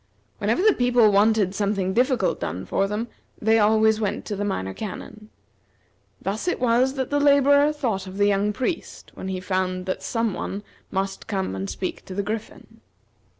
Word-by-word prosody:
Whenever 365 Hz, -, +1 dB
the 430 Hz, -1 st, +6 dB
people 245 Hz, -5 st, +4 dB
wanted 205 Hz, -1 st, +3 dB
something 200 Hz, -2 st, 0 dB
difficult 250 Hz, -4 st, +1 dB
done 95 Hz, +1 st, -4 dB
for 195 Hz, -, 0 dB
them, 210 Hz, +3 st, -3 dB, 0.3 s
they 225 Hz, +1 st, +3 dB
always 220 Hz, +1 st, +4 dB
went 210 Hz, -, -2 dB
to 210 Hz, -, -3 dB
the 200 Hz, -, -3 dB
Minor 95 Hz, -, -2 dB
Canon. 215 Hz, -, -8 dB, 0.9 s
Thus 210 Hz, -, -3 dB
it 360 Hz, -, 0 dB
was 250 Hz, +2 st, +2 dB
that 265 Hz, -1 st, -3 dB
the 290 Hz, -, +2 dB
laborer 285 Hz, +1 st, +5 dB
thought 225 Hz, -10 st, -2 dB
of 185 Hz, +1 st, -8 dB
the 205 Hz, -, +3 dB
young 205 Hz, +1 st, +2 dB
priest 260 Hz, -, -4 dB
when -, -, -7 dB
he 190 Hz, -1 st, -3 dB
found 185 Hz, 0 st, -2 dB
that 185 Hz, -, -3 dB
some 230 Hz, -3 st, -1 dB
one 200 Hz, +3 st, -4 dB, 0.3 s
must 195 Hz, 0 st, -3 dB
come 195 Hz, -, -2 dB
and 95 Hz, 0 st, -4 dB
speak 95 Hz, +2 st, -4 dB
to 185 Hz, -, -8 dB
the 200 Hz, -, -1 dB
Griffin. 215 Hz, +2 st, -7 dB
210 Hz, 180 wpm, -24 LUFS, 195-240 Hz, 0.9 s, the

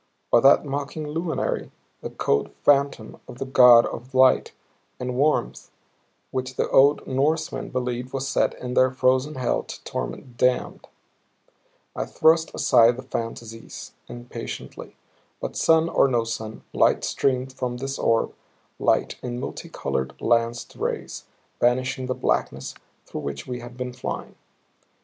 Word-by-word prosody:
Or 120 Hz, -, +6 dB
that 135 Hz, +4 st, +6 dB
mocking 145 Hz, +2 st, -4 dB
luminary, 160 Hz, +2 st, -2 dB, 0.3 s
the -, -, -5 dB
cold 70 Hz, -, 0 dB
phantom 140 Hz, -6 st, +2 dB
of 125 Hz, -, -10 dB
the 135 Hz, -, -4 dB
God 125 Hz, -3 st, +7 dB
of 130 Hz, +3 st, -7 dB
light 130 Hz, 0 st, +5 dB, 0.5 s
and 125 Hz, 0 st, -3 dB
warmth 135 Hz, -, 0 dB, 0.6 s
which 130 Hz, 0 st, -3 dB
the -, -, 0 dB
old 140 Hz, +2 st, +5 dB
Norsemen 155 Hz, +4 st, -1 dB
believed 125 Hz, -1 st, -3 dB
was 135 Hz, 0 st, -3 dB
set -, -, +1 dB
in 125 Hz, 0 st, -6 dB
their 130 Hz, 0 st, +4 dB
frozen 130 Hz, +3 st, +1 dB
hell 130 Hz, -2 st, 0 dB
to -, -, -10 dB
torment 120 Hz, -2 st, -6 dB
the -, -, +4 dB
damned? 125 Hz, -1 st, -3 dB, 1.1 s
I -, -, -3 dB
thrust 160 Hz, +1 st, +3 dB
aside 115 Hz, +1 st, +5 dB
the 130 Hz, -, -7 dB
fantasies, 115 Hz, -2 st, -6 dB
impatiently. 120 Hz, 0 st, -8 dB, 0.4 s
But -, -, -5 dB
sun 160 Hz, 0 st, +4 dB
or 155 Hz, -, +3 dB
no 120 Hz, -3 st, +1 dB
sun, 110 Hz, -1 st, -6 dB
light -, -, +3 dB
streamed 130 Hz, -1 st, 0 dB
from 125 Hz, -2 st, -3 dB
this 135 Hz, +2 st, -4 dB
orb, 115 Hz, 0 st, +1 dB, 0.5 s
light -, -, +1 dB
in 120 Hz, -1 st, -4 dB
multicolored, 65 Hz, -, -4 dB
lanced 115 Hz, 0 st, 0 dB
rays, -, -, -4 dB, 0.3 s
banishing 130 Hz, +1 st, +1 dB
the 130 Hz, -, -1 dB
blackness 65 Hz, +1 st, -1 dB, 0.3 s
through -, -, -6 dB
which 70 Hz, 0 st, -5 dB
we 125 Hz, -1 st, -5 dB
had 120 Hz, 0 st, -11 dB
been 125 Hz, -1 st, -4 dB
flying. 125 Hz, -, -5 dB
125 Hz, 140 wpm, -24 LUFS, 120-135 Hz, 1.1 s, God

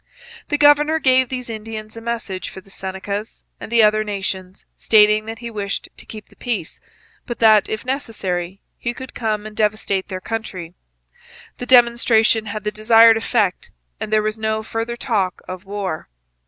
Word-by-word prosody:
The 290 Hz, -, 0 dB
governor 295 Hz, +2 st, +5 dB
gave 260 Hz, -4 st, +3 dB
these 250 Hz, -1 st, -4 dB
Indians 220 Hz, -1 st, -7 dB
a 230 Hz, -, -8 dB
message 225 Hz, -5 st, -4 dB
for -, -, -10 dB
the 195 Hz, +1 st, -16 dB
Senecas 200 Hz, +3 st, -5 dB, 0.2 s
and -, -, -9 dB
the 230 Hz, -1 st, +5 dB
other 215 Hz, 0 st, +4 dB
nations, 190 Hz, -2 st, -4 dB
stating 215 Hz, 0 st, +4 dB
that 225 Hz, 0 st, -5 dB
he 235 Hz, +1 st, -7 dB
wished 200 Hz, -2 st, -4 dB
to -, -, -11 dB
keep 215 Hz, -1 st, -10 dB
the -, -, -21 dB
peace, 225 Hz, -10 st, -3 dB, 0.5 s
but 240 Hz, -2 st, -4 dB
that, 215 Hz, -3 st, +5 dB
if 220 Hz, -, -4 dB
necessary, 195 Hz, -9 st, -3 dB, 0.2 s
he 235 Hz, 0 st, -3 dB
could 260 Hz, -1 st, -9 dB
come 215 Hz, -2 st, -2 dB
and 215 Hz, 0 st, -9 dB
devastate 210 Hz, -3 st, 0 dB
their 185 Hz, -2 st, -5 dB
country. 185 Hz, -6 st, -5 dB, 0.9 s
The 245 Hz, -, -5 dB
demonstration 235 Hz, -3 st, +4 dB
had 210 Hz, 0 st, -5 dB
the 210 Hz, -, -1 dB
desired 225 Hz, +1 st, +6 dB
effect 220 Hz, -4 st, 0 dB, 0.3 s
and 215 Hz, -, -5 dB
there 215 Hz, 0 st, +3 dB
was 215 Hz, +1 st, -2 dB
no 220 Hz, 0 st, -1 dB
further 225 Hz, +2 st, -4 dB
talk 200 Hz, -7 st, -1 dB
of 185 Hz, +1 st, -7 dB
war. 195 Hz, -, -4 dB
215 Hz, 170 wpm, -20 LUFS, 200-235 Hz, 0.9 s, desired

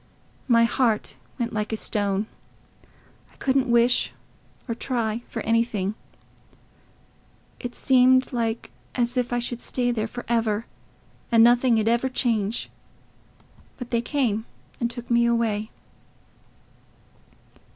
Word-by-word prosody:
My 230 Hz, -2 st, +5 dB
heart 230 Hz, -2 st, +1 dB, 0.2 s
went 235 Hz, -1 st, -2 dB
like 210 Hz, 0 st, -2 dB
a 220 Hz, -, -1 dB
stone. 205 Hz, -1 st, 0 dB, 1.1 s
I -, -, -24 dB
couldn't 265 Hz, -1 st, +1 dB
wish 235 Hz, +1 st, +3 dB, 0.6 s
or 230 Hz, -, -1 dB
try 230 Hz, -2 st, -2 dB
for 225 Hz, -, -4 dB
anything; 225 Hz, -3 st, +1 dB, 1.7 s
it 245 Hz, -1 st, -6 dB
seemed 255 Hz, 0 st, +4 dB
like 230 Hz, -1 st, -2 dB, 0.2 s
as 245 Hz, 0 st, 0 dB
if 250 Hz, -1 st, 0 dB
I 245 Hz, -, +1 dB
should 240 Hz, 0 st, -3 dB
stay 245 Hz, -1 st, 0 dB
there 225 Hz, -2 st, -1 dB
for 245 Hz, +2 st, -8 dB
ever, 225 Hz, -2 st, 0 dB, 0.7 s
and 230 Hz, -1 st, +6 dB
nothing 240 Hz, 0 st, +5 dB
'ud 215 Hz, -, 0 dB
ever 235 Hz, +3 st, +2 dB
change. 230 Hz, -4 st, -1 dB, 1.1 s
But 250 Hz, -2 st, -8 dB
they 235 Hz, -1 st, +2 dB
came 235 Hz, -5 st, -1 dB, 0.3 s
and 235 Hz, -, 0 dB
took 240 Hz, 0 st, -7 dB
me 235 Hz, 0 st, +4 dB
away." 225 Hz, -2 st, 0 dB
235 Hz, 120 wpm, -24 LUFS, 225-245 Hz, 1.7 s, and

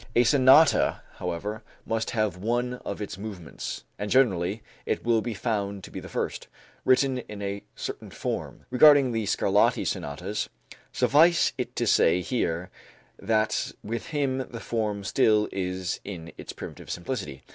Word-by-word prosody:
A 120 Hz, -, +6 dB
sonata, 135 Hz, +5 st, +5 dB
however, 95 Hz, +5 st, -4 dB, 0.2 s
must 115 Hz, 0 st, -1 dB
have 110 Hz, -5 st, 0 dB
one 120 Hz, +5 st, -1 dB
of 100 Hz, +1 st, -4 dB
its 95 Hz, -2 st, -7 dB
movements 100 Hz, -7 st, -6 dB, 0.2 s
(and 105 Hz, -, -3 dB
generally 105 Hz, -5 st, +2 dB, 0.2 s
it -, -, -2 dB
will 115 Hz, -1 st, +3 dB
be 115 Hz, 0 st, -4 dB
found 100 Hz, -3 st, -2 dB
to -, -, -10 dB
be -, -, -5 dB
the -, -, -10 dB
first) -, -, -3 dB, 0.4 s
written 130 Hz, 0 st, +3 dB
in 105 Hz, -4 st, -8 dB
a 100 Hz, 0 st, -3 dB
certain -, -, -6 dB
form. -, -, -5 dB
Regarding 140 Hz, 0 st, +7 dB
the 110 Hz, -3 st, -1 dB
Scarlatti 100 Hz, 0 st, +2 dB
sonatas, 90 Hz, +9 st, -3 dB, 0.4 s
suffice 165 Hz, +4 st, +4 dB
it -, -, -4 dB
to -, -, 0 dB
say 90 Hz, +2 st, +4 dB
here 90 Hz, -5 st, -2 dB, 0.5 s
that 110 Hz, +1 st, 0 dB
with 115 Hz, +2 st, -4 dB
him 140 Hz, -4 st, 0 dB
the 115 Hz, -, -7 dB
form 105 Hz, -4 st, -2 dB
still 105 Hz, +1 st, +3 dB
is 90 Hz, -1 st, -2 dB
in 85 Hz, -4 st, -7 dB
its -, -, -8 dB
primitive -, -, -9 dB
simplicity. 90 Hz, -, -4 dB
105 Hz, 150 wpm, -27 LUFS, 95-125 Hz, 0.5 s, Regarding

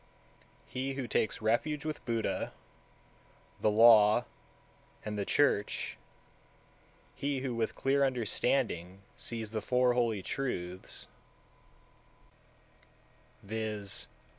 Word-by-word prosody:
190. -, -, -7 dB
He 135 Hz, +1 st, -1 dB
who 135 Hz, -3 st, -3 dB
takes 110 Hz, -1 st, 0 dB
refuge 150 Hz, +7 st, +1 dB
with 155 Hz, -1 st, -4 dB
Buddha, 115 Hz, -2 st, -1 dB, 1.1 s
the -, -, +3 dB
Law, 110 Hz, +1 st, +7 dB, 0.8 s
and 105 Hz, 0 st, -3 dB
the 100 Hz, -1 st, -2 dB
Church; 140 Hz, -8 st, +1 dB, 1.2 s
he 140 Hz, -2 st, -2 dB
who, 130 Hz, -2 st, -2 dB
with 115 Hz, -1 st, -1 dB
clear 140 Hz, +1 st, +2 dB
understanding, 115 Hz, -7 st, 0 dB
sees 115 Hz, -2 st, -5 dB
the 110 Hz, -1 st, -2 dB
four 125 Hz, +1 st, +3 dB
holy 115 Hz, -5 st, +1 dB
truths: 90 Hz, -10 st, -4 dB, 2.4 s
191. -, -, -16 dB, 0.3 s
Viz. 100 Hz, -1 st, -3 dB
115 Hz, 100 wpm, -32 LUFS, 105-135 Hz, 2.4 s, Law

